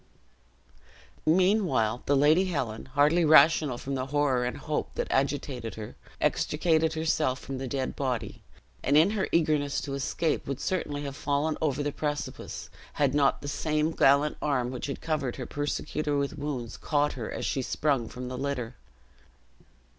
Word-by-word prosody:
Meanwhile 175 - +3
the 145 - +4
Lady 155 +7 +5
Helen, 130 -11 -3
hardly 145 +6 +3
rational 155 -3 +6
from 135 +3 -5
the 130 -1 -2
horror 135 -3 +1
and 125 +4 -3
hope 150 +1 -3
that - - -1
agitated 135 -4 -1
her, 110 -1 -8 0.2
extricated 160 0 +1
herself 155 -4 0
from 135 0 -6
the 135 - -4
dead 130 0 -2
body; 130 -4 -3 0.4
and 140 +2 +3
in 165 +6 +5
her 210 -3 -1
eagerness 150 -4 +2
to 140 - -5
escape, 150 +4 -1
would 135 -1 -3
certainly 150 -6 -2
have 140 -1 -5
fallen 145 +2 0
over 145 -2 0
the 145 - -1
precipice, 145 0 -4 0.2
had 140 -2 +1
not 145 -1 +2
the - - -5
same 155 +2 0
gallant 140 0 +3
arm 125 -4 0
which 130 - -4
had 140 - -5
covered 150 -6 -1
her 130 - -5
persecutor 145 +1 -2
with 140 0 -1
wounds, 130 -6 -4
caught 145 -1 +1
her 115 -4 -5
as - - -4
she 135 - 0
sprung 135 -3 0
from 125 0 -7
the 125 0 -5
litter. 130 -4 -3
145 Hz, 160 wpm, -28 LUFS, 130-155 Hz, 0.4 s, rational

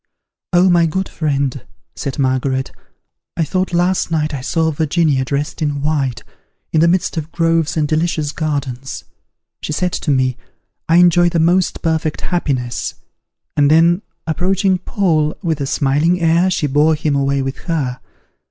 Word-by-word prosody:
"O 180 +1 +4
my 170 -2 +4
good 190 +4 -2
friend," 140 -4 -2 0.3
said 135 - -4
Margaret, 130 0 0 0.7
"I 165 - +2
thought 185 +4 -1
last 175 +1 +1
night 155 -2 -1
I 135 - -4
saw 160 +4 0
Virginia, 155 -2 +1
dressed 140 +5 -3
in 145 -2 -1
white, 135 -6 -1 0.5
in 155 - +4
the 170 - +5
midst 175 -1 +1
of 160 0 -4
groves 165 -2 +1
and 150 -1 +1
delicious 155 -1 0
gardens. 140 -5 -4 0.6
She - - -4
said 180 +3 0
to - - -3
me, 130 -2 +1 0.5
'I 165 - +4
enjoy 175 0 +5
the 170 -1 0
most 175 +3 +1
perfect 160 -2 -1
happiness:' 130 -9 -2 0.6
and 145 -1 +4
then 170 +4 +4 0.2
approaching 185 +3 +1
Paul 165 -6 0
with 160 -4 -1
a 135 - -1
smiling 150 +7 +1
air, 170 +2 +3
she 175 - 0
bore 150 +3 +3
him 150 -1 -1
away 140 0 +1
with 135 0 -4
her. 135 -7 -1
155 Hz, 155 wpm, -17 LUFS, 140-170 Hz, 0.7 s, the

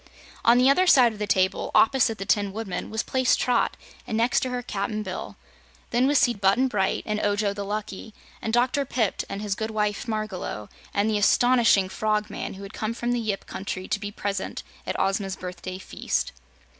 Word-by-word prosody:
On 235 +1 +6
the 250 +1 +5
other 365 +7 +4
side 250 -8 +6
of 210 - -11
the 210 - -2
table, 190 -1 +1
opposite 230 -2 +4
the 195 - -5
Tin 205 0 +1
Woodman 215 -3 -4
was 220 +1 -2
placed 260 -1 +2
Trot, 250 - +1 0.3
and 220 - -1
next 235 +2 +3
to 255 - -2
her, 250 0 -3
Cap'n 215 -1 -3
Bill. 185 - -6 0.6
Then 250 +2 +3
was 290 +1 +3
seated 240 -7 +2
Button 205 +7 +4
Bright 195 -6 0
and 210 -1 -1
Ojo 205 -1 +1
the 200 0 -5
Lucky, 210 +1 -5 0.3
and 220 - -2
Dr. 250 +4 +2
Pipt 235 -6 -1
and 200 +1 -5
his 205 -2 -1
good 220 +2 -3
wife 210 +2 -1
Margalot, 215 - -4 0.2
and 200 +1 +1
the 215 -1 +1
astonishing 230 -3 +4
Frogman, 210 +1 -2
who 195 - -9
had 195 - -9
come 220 +1 -3
from 240 0 -2
the 245 - +1
Yip 215 -4 -2
country 190 -1 -5
to 210 - 0
be 205 0 -4
present 200 -1 -4 0.2
at - - -2
Ozma's 195 0 0
birthday 185 0 -7
feast. 190 - -2
215 Hz, 195 wpm, -25 LUFS, 195-240 Hz, 0.6 s, On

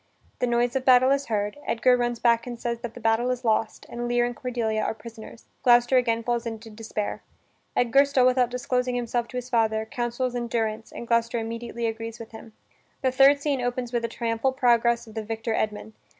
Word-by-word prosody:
The 250 - +1
noise 240 +1 +1
of 265 - 0
battle 255 0 +6
is 280 0 +1
heard, 210 +3 -2
Edgar 250 +2 +3
runs 240 -1 -1
back 235 +1 +2
and 240 -1 -6
says 235 -1 -3
that 235 -1 -7
the - - -8
battle 225 +2 +1
is 250 0 -3
lost 220 0 0
and 240 0 -5
Lear 240 0 +2
and 245 0 -4
Cordelia 230 -4 -2
are 220 - -1
prisoners. 225 0 -12 0.2
Gloucester 240 +1 +5
again 230 -2 +2
falls 240 0 -1
into 225 0 -7
despair. 215 -1 -4 0.5
Edgar, 250 +4 +4
still 265 -3 +2
without 250 -1 +3
disclosing 250 0 -1
himself 240 -1 -1
to 250 - -7
his 250 0 -6
father, 220 -2 +1
counsels 240 +1 -2
endurance, 225 -2 -2
and 235 - -8
Gloucester 235 0 +1
immediately 230 +1 -4
agrees 225 0 -4
with 230 -1 -10
him. 225 0 -12 0.5
The 260 - +3
third 275 +2 +5
scene 280 -3 0
opens 245 0 -3
with 240 -1 0
a - - 0
triumphal 230 +3 -1
progress 235 -2 +2
of 220 - -13
the 220 - -3
victor 225 +1 -3
Edmund. 215 0 -2
235 Hz, 205 wpm, -25 LUFS, 225-250 Hz, 0.5 s, battle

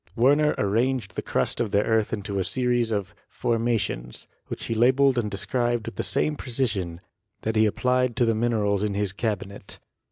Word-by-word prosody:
Werner 145 +5 +4
arranged 115 +2 0
the - - -2
crust - - -1
of 115 - 0
the 100 +1 +2
earth 110 -2 +1
into 100 -1 -3
a - - +1
series 120 +4 0
of 100 -4 -2 0.2
"formations," 115 - -2 0.2
which - - -6
he - - -2
labeled 130 +4 +4
and 105 -3 -1
de 100 - -5
scribed 120 +3 -1
with - - -6
the - - -2
same 150 - 0
precision 105 -11 -2 0.4
that 110 0 -2
he 110 0 +5
applied 125 +2 +1
to 120 - +3
the 115 - +2
min 120 +2 +1
erals 100 -2 +1
in 105 -2 -1
his 100 -2 -1
cabinet. 105 -2 -4
110 Hz, 190 wpm, -25 LUFS, 100-120 Hz, 0.4 s, he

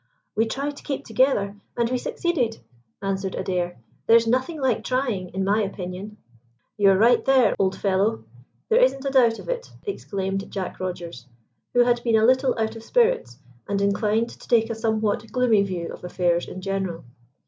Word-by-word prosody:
"We 225 +1 +2
tried 280 +5 -3
to - - -12
keep 275 - -4
together, 215 -4 +1 0.2
and 235 -1 +2
we 250 +1 -1
succeeded," 250 -8 -1 0.5
answered 195 -1 -2
Adair. 180 -2 -2 0.3
"There's 230 0 +6
nothing 260 +7 0
like 260 -5 +1
trying, 245 -8 -1
in 190 +2 -3
my 205 +3 +2
opinion." 195 +1 -5 0.6
"You 205 -2 +4
are 190 - +5
right 235 +4 +4
there, 260 -5 +4
old 190 -1 +1
fellow; 190 - +1 0.4
there 470 +2 +4
isn't 285 - +2
a 275 - 0
doubt 240 -4 +4
of - - -11
it," - - -3 0.2
exclaimed 195 - -3
Jack 190 -2 -5
Rogers, 175 -8 -6 0.5
who 245 - +6
had 240 0 +2
been 230 -2 +2
a 220 0 +4
little 260 +2 +3
out 220 0 -1
of 225 - -8
spirits, 470 - +1 0.3
and 200 -1 0
inclined 210 +3 +1
to - - -14
take 230 -1 +3
a - - 0
somewhat 220 -1 -1
gloomy 245 -5 +3
view 180 -4 -3
of - - -11
affairs 175 -1 0
in 185 - -8
general. 190 -3 -3
220 Hz, 180 wpm, -24 LUFS, 195-250 Hz, 0.6 s, There's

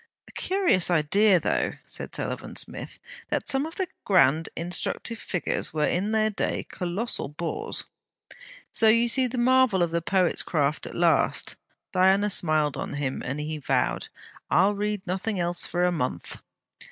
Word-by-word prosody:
'A - - -14
curious 370 - +1
idea, 180 +4 +4
though,' - - 0
said - - -6
Sullivan - - -4
Smith, - - -5 0.3
'that - - -2
some 275 +2 +1
of 325 - -10
the 380 - -2 0.2
grand 165 -5 +3
instructive 180 +6 -3
figures 175 -3 -2
were 150 -1 +2
in 195 +5 0
their 215 0 +2
day 205 - -2
colossal 185 +7 -3
bores!' 175 - -4 0.9
'So 225 - +5
you 230 +2 +5
see 255 +2 +2
the 250 +1 -5
marvel 245 -6 +4
of 170 - -1
the 170 0 0
poet's 185 0 +2
craft 150 -2 -1
at - - -9
last?' 170 -4 +2 0.4
Diana 190 +3 +4
smiled 155 -5 +1
on - - -4
him, 140 -2 -3
and 140 +3 -3
he 155 +1 -4
vowed: 140 - 0 0.4
'I'll 195 +4 +4
read 205 -1 -2
nothing 190 +3 -2
else 175 0 0
for 175 0 -1
a 180 - +3
month!' 125 - -3
185 Hz, 160 wpm, -26 LUFS, 165-220 Hz, 0.9 s, So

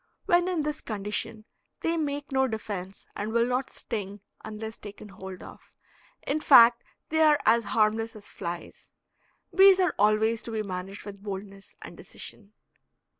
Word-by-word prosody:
When 350 -2 +3
in 350 -4 0
this 300 0 -3
condition 210 0 -3 0.4
they 330 - 0
make 290 -3 -3
no 265 0 +2
defense 200 -4 -6
and 210 +2 -3
will 235 +1 +3
not 250 +2 -1
sting 205 -3 -6 0.2
unless 220 +1 -7
taken 205 0 -10
hold 190 -1 -9
of. - - -14 0.5
In 295 +3 0
fact 240 -5 +7 0.3
they 315 +1 +1
are 305 -2 +5
as 230 0 +4
harmless 220 +2 +1
as 210 -1 -9
flies. 175 -2 -7 0.6
Bees 385 0 +7
are 365 -1 +2
always 215 +2 +3
to 230 - -7
be 220 -1 -2
managed 190 +1 -6
with 200 -1 -9
boldness 195 -1 -8
and - - -10
decision. 210 -1 -11
220 Hz, 155 wpm, -27 LUFS, 205-270 Hz, 0.6 s, fact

